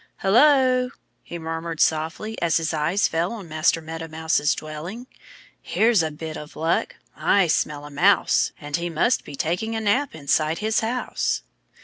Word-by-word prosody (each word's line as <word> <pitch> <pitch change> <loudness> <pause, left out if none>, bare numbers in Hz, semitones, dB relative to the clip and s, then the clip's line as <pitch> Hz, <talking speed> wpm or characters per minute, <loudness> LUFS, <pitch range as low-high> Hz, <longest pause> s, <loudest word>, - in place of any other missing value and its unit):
"Hullo!" 255 +3 +4 0.3
he 170 - -8
murmured 165 0 -5
softly 160 +8 0
as 165 -3 +2
his 165 0 -1
eyes 160 +6 +1
fell 165 +2 -1
on 205 -6 -8
Master 155 +1 +1
Meadow 165 +1 -6
Mouse's 160 -2 +1
dwelling. 160 +10 -7 0.6
"Here's 225 -3 +3
a 160 - -1
bit 155 +1 -7
of 150 0 -10
luck. 165 +2 0 0.2
I 180 +5 +3
smell 150 -2 -1
a 145 - -10
Mouse. 185 +8 +3
And 145 -1 -3
he 170 0 -3
must 170 +10 +1
be 145 - -9
taking 180 +10 -2
a - - -1
nap 235 - 0
inside 155 +2 +1
his 215 +3 +1
house." 240 +3 -2
165 Hz, 160 wpm, -23 LUFS, 155-215 Hz, 0.6 s, Hullo